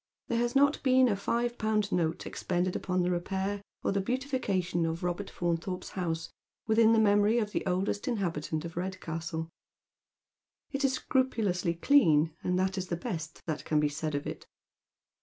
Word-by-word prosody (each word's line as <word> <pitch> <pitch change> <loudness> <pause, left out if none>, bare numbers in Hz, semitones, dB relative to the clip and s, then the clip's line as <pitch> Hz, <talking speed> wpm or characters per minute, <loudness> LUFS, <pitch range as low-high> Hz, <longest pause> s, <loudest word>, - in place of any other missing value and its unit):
There 235 - +1
has 240 +2 0
not 285 +2 +4
been 260 -1 +5
a 210 - +2
five 235 +4 -1
pound 215 -1 +1
note 165 -2 0
expended 180 0 -1
upon 180 -1 0
the 180 - +1
repair 190 +3 -2 0.2
or - - +1
the 195 0 +1
beautitication 200 -8 -1
of 165 +1 -2
Robert 180 +3 -2
Faunthorpe's 175 +1 -2
house 165 -3 -3 0.3
within 225 0 +5
the 225 - +5
memory 205 +1 +4
of 210 -3 0
the - - -1
oldest 190 +2 -1
inhabitant 170 -8 -2
of 165 - -7
Redcastle. 165 -3 -4 1.2
It 275 0 -2
is 270 -1 +3
scrupulously 215 -11 0
clean, 165 - +4
and 180 0 +1
that 190 +1 0
is 185 - -4
the 170 - -1
best 160 -2 -5
that 155 -3 -3
can 155 - +1
be 150 -1 +2
said 155 0 -3
of 145 - -2
it. - - -6
185 Hz, 170 wpm, -30 LUFS, 170-220 Hz, 1.2 s, been